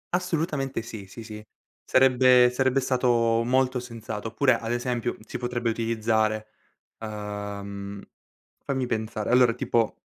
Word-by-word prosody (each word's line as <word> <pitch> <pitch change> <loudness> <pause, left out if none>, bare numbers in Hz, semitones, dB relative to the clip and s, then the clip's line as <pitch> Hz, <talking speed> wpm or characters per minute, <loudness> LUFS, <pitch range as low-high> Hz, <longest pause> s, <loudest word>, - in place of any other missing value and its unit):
Assolutamente 155 -8 -1
sì, 110 -3 -8
sì, 115 +4 -10
sì. 105 -1 -9 0.4
Sarebbe 130 -1 +5
sarebbe 130 +1 +2
stato 120 -3 +2
molto 130 +1 +1
sensato. 115 -3 -6
Oppure, 130 +4 +3
ad 115 0 -4
esempio, 120 0 -2
si - - -6
potrebbe 120 -1 -1
utilizzare, 110 -1 0 0.5
uhm, 100 -2 -6 0.6
fammi 130 -2 -1
pensare, 110 -1 -2
allora 125 -2 +5
tipo 115 -2 -1
115 Hz, 120 wpm, -26 LUFS, 110-125 Hz, 0.6 s, Sarebbe